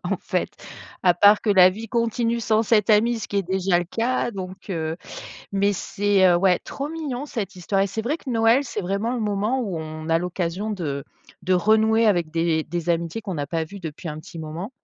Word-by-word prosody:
en - - 0
fait, - - -2 0.5
à 180 -1 +5
part 205 +4 +5
que 215 - +1
la 185 -2 +7
vie 220 +5 -6
continue 235 0 0
sans 220 +1 +2
cette 215 -1 +2
amie, 225 +2 +4
ce - - -6
qui 205 - -3
est 200 - +2
déjà 190 0 +1
le 175 - -1
cas 235 +7 -1
donc, 190 -3 -6
heu, 160 -2 -2 0.5
mais 200 +1 +2
c'est, 200 +1 +1
heu, 175 - +5
ouais, 180 0 +3
trop 280 +1 -5
mignon 295 -4 -4
cette 205 -8 -5
histoire 195 +2 -1
et - - +2
c'est 200 +4 -3
vrai 270 +8 -1
que 275 - -8
Noël, 230 +3 +4
c'est 225 -5 -4
vraiment 200 +5 -1
le 245 - -2
moment 210 +5 0
où 195 -8 -3
on 155 0 -7
a 165 0 +3
l'occasion 180 +3 -3
de 150 -8 -3 0.4
de 185 - 0
renouer 220 +3 +3
avec 175 -6 +2
des 165 -1 +1
des 175 +1 -4
amitiés 170 +5 -1
qu'on 195 -4 -5
n'a 145 -2 -3
pas 165 -1 -1
vues 200 +5 -10
depuis 165 0 -7
un 150 0 -5
petit 165 - -11
moment. 160 +7 -6
195 Hz, 220 wpm, -23 LUFS, 175-225 Hz, 0.5 s, la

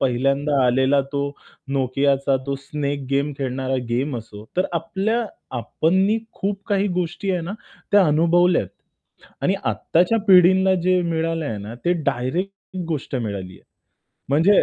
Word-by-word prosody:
पहिल्यांदा 135 +2 +1
आलेला 130 +3 +3
तो 140 - 0 0.6
नोकियाचा 135 +1 +2
तो 140 - -1
स्नेक 140 0 -3
गेम 140 +2 +1
खेळणारा 130 0 -2
गेम 125 +3 -1
असो. 105 -2 -11
तर 185 - +2
आपल्या 195 +8 -1 0.3
आपणनी 190 - +1 0.2
खूप 200 0 -3
काही 200 -1 +2
गोष्टी 180 +2 -2
आहे 180 - 0
ना, 170 +4 -5 0.4
त्या 205 -1 +7
अनुभवल्यात 170 +4 +3 0.7
आणि - - +2
आत्ताच्या 180 +7 +2
पिढींना 190 +1 +6
जे 185 0 +3
मिळालं 165 -1 -1
आहे 110 -6 -3
ना, 105 +3 -7
ते 170 +9 0
डायरेक्ट 170 +10 -3
गोष्ट 150 -4 -3
मिळाली 100 -6 -4
आहे, - - -18 0.7
म्हणजे 165 +9 +5
150 Hz, 135 wpm, -22 LUFS, 135-185 Hz, 0.7 s, त्या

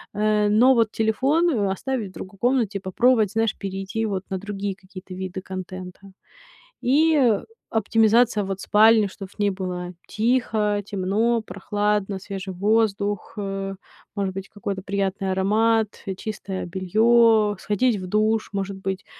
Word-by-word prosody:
Э, 210 0 +2
но 240 +5 +5
вот 230 -3 +2
телефон, 270 +10 +2
э, 205 -8 0
оставить 235 +1 -3
в - - -18
другой 190 +1 -10
комнате, 235 -5 +1
попробовать, 215 +2 +2
знаешь, 225 -1 0
перейти, 195 +3 -3
вот, 195 -3 -3
на 190 - -1
другие 200 0 -4
какие-то 185 -1 -11
виды 190 0 -5
контента. 185 -1 -8 0.8
И, 310 +5 +3
э, 240 -8 +3 0.3
оптимизация, 225 0 +3
вот, 195 0 -4
спальни, 215 0 +5
чтоб 195 0 -9
в - - -23
ней 205 -1 +2
было 180 -2 -5
тихо, 215 -2 +1
темно, 210 +4 0
прохладно, 205 0 -1
свежий 195 0 -6
воздух, 205 0 0
э, 195 -1 -4 0.4
может 195 -2 -1
быть, 195 0 -6
какой-то 200 -2 -5
приятный 195 0 -2
аромат, 215 +3 +1
чистое 200 -2 -5
бельё, 215 +4 +3
сходить 210 +4 +1
в 185 -1 -6
душ, 215 +3 +1
может 195 0 -3
быть, 190 0 -4
205 Hz, 140 wpm, -23 LUFS, 195-225 Hz, 0.8 s, но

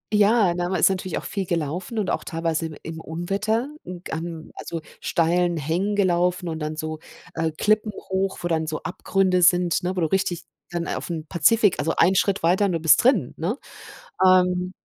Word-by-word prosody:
ja, 210 -3 +4
na, 175 0 -2
man 185 -3 0
ist - - +6
natürlich 190 -1 -2
auch - - -6
viel 195 -3 -3
gelaufen 170 +6 -3
und 210 -3 0
auch - - -2
teilweise 165 0 -2
im 155 - -9
im 160 0 -6
Unwetter 200 - -2
'n 180 -1 -8
gan 165 0 -6
also, 165 - -5 0.2
steilen 175 +1 +1
Hängen 175 +8 -1
gelaufen 180 -2 +1
und 160 0 -4
dann 155 0 -3
so, 155 0 -4 0.3
äh, 160 -1 -1
Klippen 215 0 +2
hoch, 190 0 -3
wo - - 0
dann 160 -2 0
so 155 - -4
Abgründe 185 0 +1
sind, 175 -1 +4
ne, 185 +1 -1
wo 180 - +1
du 160 - +2
richtig 185 -1 -1 0.3
dann 170 -1 -3
auf'm 160 -3 -4
Pazifik 195 +4 +3
also, 160 +3 0
einen 185 +3 +4
Schritt 200 +1 +1
weiter 185 +4 +3
und 190 - +1
du 165 - 0
bist 160 -1 +5
drin, 235 - +3
ne, 190 - -2 0.7
ähm 180 0 +3
180 Hz, 195 wpm, -23 LUFS, 165-190 Hz, 0.7 s, ist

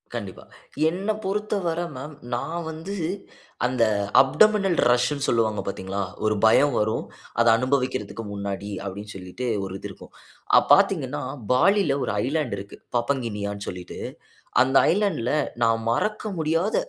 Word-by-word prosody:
கண்டிப்பா. 100 -5 -6 0.5
என்னப் 205 +5 -2
பொறுத்தவர 195 -4 -1 0.2
மேம், 145 +4 -7 0.2
நான் 165 +8 -3
வந்து 165 +5 -6 0.7
அந்த 125 -1 +2 0.4
அப்டமினல் 195 +6 +3
ரஷ்ன்னு 135 +4 +1
சொல்லுவாங்க 110 -3 +1
பாத்தீங்களா? 95 0 -3 0.2
ஒரு 110 0 +2
பயம் 140 +6 +5
வரும், 110 +1 0 0.4
அதை 115 - +5
அனுபவிக்கிறதுக்கு 125 -4 -1
முன்னாடி 100 0 -4 0.2
அப்டின்னு 100 +2 -6
சொல்லிட்டு 95 +6 -6 0.2
ஒரு 95 0 -6
இது - - -6
இருக்கும். - - -14 0.4
அ - - +10
பாத்தீங்கன்னா, 150 -8 +2 0.3
பாலில 150 +2 +4
ஒரு - - -1
ஐலேண்ட் 140 -5 -1
இருக்கு. 100 +1 -9 0.2
பாப்பங்கினியான்னு 110 -5 -2
சொல்லிட்டு, 90 -1 -8 0.6
அந்த 130 +1 +2 0.2
ஐலேண்ட்ல 175 - 0 0.3
நான் 115 0 +3
மறக்க 210 - 0
முடியாத, 165 +6 +1
130 Hz, 125 wpm, -24 LUFS, 105-165 Hz, 0.7 s, அ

